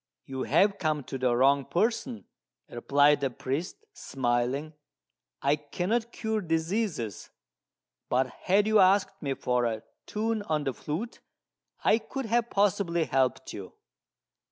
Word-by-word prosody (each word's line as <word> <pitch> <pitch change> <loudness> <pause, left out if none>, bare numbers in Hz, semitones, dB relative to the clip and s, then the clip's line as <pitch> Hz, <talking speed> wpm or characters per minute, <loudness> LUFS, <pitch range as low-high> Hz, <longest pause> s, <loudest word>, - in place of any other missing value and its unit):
"You 130 -1 -5
have 195 +7 +3
come 155 -4 0
to 135 - -6
the 125 -2 +2
wrong 135 +2 +4
person," 175 - -1 0.4
replied 145 +4 +3
the 135 - +1
priest, 155 - -4
smiling; 130 +4 -1 0.7
"I 140 +2 +4
cannot 185 +11 -2
cure 220 -1 -2
diseases; 165 - -2 0.8
but 130 +2 +2
had 190 +10 +1
you 215 0 +4
asked 195 +1 +3
me 140 -2 -2
for 125 -1 0
a 110 -2 -2 0.2
tune 220 +1 -1
on 155 -1 +1
the 135 -2 -1
flute, 180 - -5 0.6
I 220 - +4
could 270 +4 -5
have 235 +1 +1
possibly 195 -4 +1
helped 130 -2 0
you." 95 -2 -8
155 Hz, 130 wpm, -28 LUFS, 130-205 Hz, 0.8 s, wrong